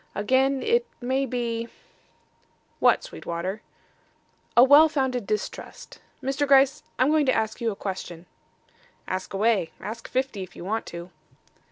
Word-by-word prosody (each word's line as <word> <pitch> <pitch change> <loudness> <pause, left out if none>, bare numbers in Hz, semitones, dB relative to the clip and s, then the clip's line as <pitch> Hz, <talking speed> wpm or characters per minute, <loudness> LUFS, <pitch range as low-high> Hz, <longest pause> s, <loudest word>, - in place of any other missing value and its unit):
Again 260 +5 +2
it 475 +1 +2
may 265 +2 0
be 235 -2 -2 0.6
" - - -40
"What, - - +4
Sweetwater?" 190 - -5 1.0
"A 240 - +10
well 290 +4 +7
founded 260 -7 -1
distrust. 210 -1 -5 0.2
Mr. 275 +2 0
Gryce, 275 0 +5 0.2
I'm 255 +4 +3
going 305 -2 +3
to 260 - +3
ask 220 +2 -2
you 230 - +1
a 210 - -4
question." 185 -3 -6 0.8
"Ask 185 0 -4
away. 200 -3 +1
Ask 225 +2 -7
fifty 260 -6 -2
if 185 - -9
you 175 - -9
want 220 +4 -2
to." 170 +1 -8
235 Hz, 145 wpm, -25 LUFS, 200-270 Hz, 1.0 s, A